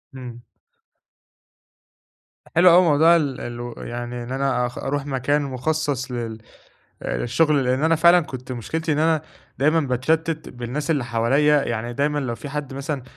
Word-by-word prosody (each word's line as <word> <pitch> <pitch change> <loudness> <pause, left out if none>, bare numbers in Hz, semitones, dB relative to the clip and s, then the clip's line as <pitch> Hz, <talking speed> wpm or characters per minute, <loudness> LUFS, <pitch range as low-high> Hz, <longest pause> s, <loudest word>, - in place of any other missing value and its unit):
همم. 120 -2 -9 2.1
حلو 180 +1 +7
أوي 180 - +7
موضوع 160 +1 +5
ال 140 -6 -1
الو 120 0 -6
يعني 120 +1 -6
إن 120 +2 -7
أنا 130 -2 0
أخ 120 - -7
أرُوح 140 +1 -3
مكان 145 +2 0
مخصّص 140 0 -2
لل 115 -2 -4 0.6
آآ، - - -2
للشُغل، 145 +2 +2
لإن 130 +4 +1
أنا 165 +1 +3
فعلًا 170 +2 +6
كنت 130 -5 -7
مشكلتي 155 +7 -3
إن 145 - -1
أنا 160 -1 +2 0.4
دايمًا 155 +4 +3
باتشتِّت 155 +4 -1
بالناس 125 +6 -4
اللي 140 -6 +1
حواليّا، 135 +6 +2
يعني 120 +1 -3
دايمًا 145 +3 0
لو 130 -4 -2
في 145 - -8
حَدّ 145 -2 -5
مثلًا 140 -1 -4
140 Hz, 155 wpm, -22 LUFS, 125-155 Hz, 2.1 s, حلو